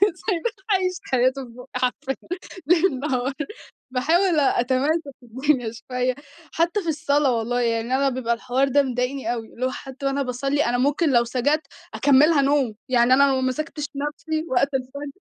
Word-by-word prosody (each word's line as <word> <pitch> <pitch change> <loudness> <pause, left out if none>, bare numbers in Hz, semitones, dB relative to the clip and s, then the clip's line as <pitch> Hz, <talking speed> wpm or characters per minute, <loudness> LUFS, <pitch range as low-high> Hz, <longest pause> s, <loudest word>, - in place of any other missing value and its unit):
سايباه 390 +3 -2 0.2
عايش 370 -2 +1 0.2
حياته 260 +1 +2
في - - -14
بوقي 250 +2 -13
حرفيًا 255 +1 -1 0.5
ليل 335 -5 +3
نهار، 265 -2 -1 0.6
باحاول 320 +6 +2
أ 270 -3 +2
أتماسك 280 +4 0
الدنيا 250 0 0
شوية، 250 +2 -2 0.4
حتى 345 +5 +1
في 335 - -2
الصلاة 285 -4 +1
والله 245 +2 -1
يعني 230 +1 0
أنا 275 0 +2
بيبقى 250 -2 -1
الحوار 255 +3 0
ده 285 +2 +3
مضايقني 250 -1 -2
أوي، 225 -2 -5
اللي 255 +2 -2
هو 260 - 0
حتى 270 +1 -8
وأنا 275 +1 0
باصلي 275 +3 0
أنا 240 +1 +1
ممكن 290 +5 +2
لو 235 -1 +5
سجدت 275 +6 0 0.3
أكملها 290 +2 +5
نوم، 275 -5 +1
يعني 245 0 +4
أنا 280 +2 +6
لو 270 - +2
ما 260 - 0
مسكتش 300 +2 -3
نفسي 310 +2 -3
وقت 275 +2 +2
الفجر، 275 +2 -4
270 Hz, 170 wpm, -23 LUFS, 250-295 Hz, 0.6 s, أنا